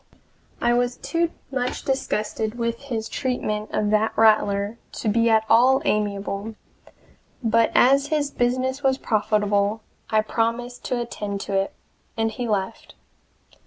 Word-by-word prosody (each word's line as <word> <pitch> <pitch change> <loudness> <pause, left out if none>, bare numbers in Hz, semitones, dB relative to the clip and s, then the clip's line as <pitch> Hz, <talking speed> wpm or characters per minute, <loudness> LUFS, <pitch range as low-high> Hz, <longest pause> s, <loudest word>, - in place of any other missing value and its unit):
I 240 - +2
was 245 0 0
too 335 0 -1 0.2
much 250 -2 -2
disgusted 220 -4 -2
with 235 -1 -2
his 225 -5 -3
treatment 215 -5 -2
of 210 -1 0
that 215 +1 +1
Rattler 215 -1 +3
to - - -4
be 230 +2 +3
at 220 -1 +4
all 255 +4 +5
amiable, 205 +1 -1 0.9
but 230 0 +3
as 275 +3 +5
his 290 -2 0
business 255 +2 0
was 265 -2 +2
profitable, 210 -2 +1 0.3
I 215 -1 +3
promised 235 +3 -2
to 250 - -1
attend 210 -4 -4
to - - -5
it, 195 0 0 0.4
and 225 0 +1
he 240 +2 -4
left. 205 0 -3
225 Hz, 135 wpm, -23 LUFS, 210-245 Hz, 0.9 s, all